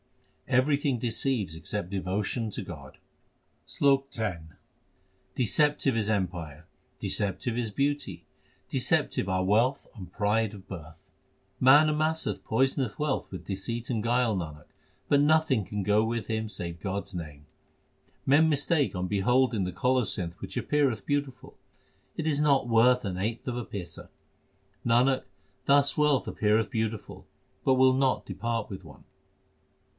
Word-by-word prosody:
Everything 135 0 +2
deceives 115 - -1
except 90 +2 -5
devotion 100 +4 -2
to - - -5
God: 70 -7 -10 0.7
SLOK 135 -1 +2
X 100 -7 -2 0.9
Deceptive 140 +2 +2
is 110 -2 0
empire, 85 -6 -3 0.3
deceptive 105 +4 -2
is 115 -3 -2
beauty, 145 +5 -2 0.4
deceptive 95 - 0
are 95 0 0
wealth 115 +8 +2
and 90 -5 -10
pride 105 +1 0
of 100 -1 -12
birth. 80 -3 -9 0.6
Man 145 +4 +7
amasseth 155 +1 0
poisonous 130 -4 0
wealth 150 -2 -1
with 95 - -8
deceit 115 +5 -4
and 115 -4 -1
guile, 120 -1 +2
Nanak, 75 -4 -6 0.4
but 145 -1 +4
nothing 150 -6 +3
can 105 +1 -4
go 105 +2 +3
with 115 -1 -2
him 110 -1 -2
save 85 -5 -6
God 100 0 -2
s - - -9
name. 75 -4 -7 0.8
Men 150 +4 +5
mistake 145 0 +1
on 90 0 -2
beholding 115 +3 +2
the 90 - -3
colocynth 95 -3 0
which - - -6
appeareth 135 -8 +1
beautiful 145 -3 -3 0.6
It 160 - -2
is 150 -2 +1
not 140 -4 +3
worth 120 +1 +4
an 90 -2 -3
eighth 110 +6 -3
of 125 - -2
a 120 - -3
paisa; 90 -6 -8 0.7
Nanak, 125 +3 +3 0.4
thus 140 0 +4
wealth 150 -3 +2
appeareth 110 +1 +1
beautiful, 110 -2 -4 0.4
but 130 - +4
will 130 0 +5
not 130 0 +1
depart 115 +3 -3
with 95 -1 -7
one. 80 - -15
115 Hz, 140 wpm, -28 LUFS, 95-135 Hz, 0.9 s, Man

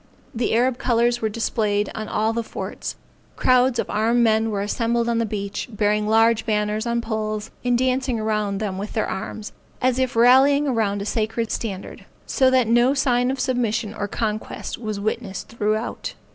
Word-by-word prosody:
The 230 -1 0
Arab 250 +2 +2
colors 240 -1 +2
were 220 - 0
displayed 210 -2 -1
on 215 -1 -5
all 220 +2 0
the 235 - -1
forts; 225 - -6 0.4
crowds 255 0 +3
of - - -1
armed 230 +3 +2
men 220 0 +3
were 200 -2 -1
assembled 230 +2 0
on 235 -1 +1
the 230 - 0
beach, 200 +2 -4
bearing 210 0 +1
large 225 +1 +4
banners 210 0 -1
on 235 0 0
poles, 215 -2 -3
and 245 -1 +2
dancing 255 -1 0
around 215 -2 -1
them 195 -2 -3
with 205 +2 -5
their 220 - 0
arms, 210 +2 -5 0.3
as 255 0 +1
if 260 -2 0
rallying 265 +5 +5
around 210 -6 0
a - - -6
sacred 225 +1 -1
standard, 200 -4 -5 0.2
so 260 -1 +3
that 260 -3 +3
no 240 +4 +4
sign 250 -2 +2
of 265 0 -2
submission 230 -4 -1
or 205 -2 -3
conquest 215 0 -3
was 215 -3 -4
witnessed 200 -2 -3
throughout. 215 0 -2
225 Hz, 175 wpm, -22 LUFS, 215-245 Hz, 0.4 s, rallying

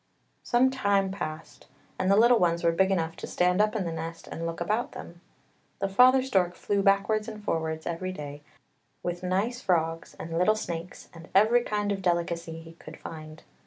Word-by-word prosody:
Some 255 +2 +3
time 200 -7 +1
passed 155 -5 -7 0.3
and 185 - +1
the 195 - +6
little 235 +2 +6
ones 170 -1 +1
were 170 - +4
big 190 +3 +2
enough 165 -4 0
to - - -6
stand 180 +2 +2
up 215 +1 +1
in 200 -4 -1
the 170 - -2
nest 165 +1 -6
and 165 0 -5
look 165 - -5
about 215 +7 -1
them. 170 0 -10 0.6
The 195 - -1
father 255 +6 +6
stork 185 -9 +1
flew 200 +2 0
backwards 200 +2 +2
and 215 -2 -8
forwards 160 -3 -2
every 175 +2 -3
day, 145 -4 -7 0.6
with 175 0 -3
nice 200 +7 -1
frogs 165 -3 -1
and 165 0 -5
little 215 +4 +4
snakes, 170 -4 -6
and 165 -1 -12
every 220 +5 +5
kind 205 -3 -1
of 195 -1 -2
delicacy 170 -2 -1
he 165 0 -12
could 155 -2 -12
find. 155 -1 -9
180 Hz, 190 wpm, -27 LUFS, 165-210 Hz, 0.6 s, the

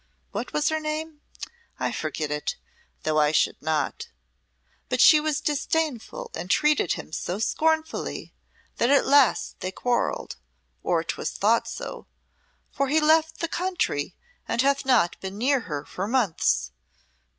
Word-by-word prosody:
What - - -4
was 300 0 +1
her 315 0 0
name? 310 0 -4 0.6
I - - 0
forget 150 -2 -3
it, 150 0 -2 0.5
though 155 0 +1
I 150 0 +4
should 155 - +1
not. 155 -2 -1 0.8
But 250 - 0
she 305 +5 +8
was 305 -1 0
disdainful 295 -4 -2
and 175 +3 -6
treated 300 - +3
him - - -8
so 175 +3 -3
scornfully 315 +8 -1 0.4
that 235 - +2
at 285 0 +4
last 280 -4 +3
they 185 - -3
quarrelled 245 +5 -1 0.4
or - - +1
'twas - - -3
thought - - +2
so - - -7 0.6
for 275 0 0
he 305 +4 +3
left 320 +1 +3
the 335 - 0
country 330 - -1 0.3
and 235 - +1
hath 275 -1 +1
not 235 -10 +3
been 190 +1 -6
near 265 +4 +2
her 145 -1 -4
for 190 +2 -4
months. 175 - +1
265 Hz, 145 wpm, -25 LUFS, -, 0.8 s, she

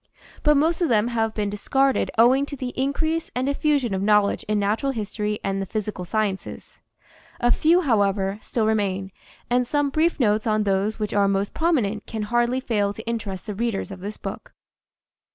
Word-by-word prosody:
But 300 -1 +4
most 320 +5 +1
of 340 - +2
them 225 0 +3
have 225 -2 -1
been 205 -2 -1
discarded 270 +6 +1
owing 260 +5 +5
to 285 - -6
the 255 -2 -4
in 265 +2 -1
crease 320 +3 -1
and 250 +1 0
diffusion 280 -4 +1
of 190 - -1
knowledge 210 0 +3
in 215 0 +1
natural 215 +7 0
history 210 -1 -3
and 195 0 -1
the 195 - -4
physical 210 -3 -4
sciences. 200 0 -3 0.6
A 240 0 +2
few, 335 +7 +4
however, 200 - +1
still 225 -3 -1
remain, 195 -3 0 0.4
and 245 0 +1
some 290 +1 0
brief 320 +3 +1
notes 215 -2 +2
on 215 -1 +2
those 200 +2 0
which 210 -2 -3
are 200 -1 +3
most 195 +1 0
prominent 240 -11 0
can 220 -2 -4
hardly 240 +3 +1
fail 205 -5 0
to 220 - -10
interest 205 -5 -4
the 210 - -4
readers 215 -1 -2
of 190 - -8
this 205 +3 -6
book. - - -7
220 Hz, 190 wpm, -23 LUFS, 205-260 Hz, 0.6 s, owing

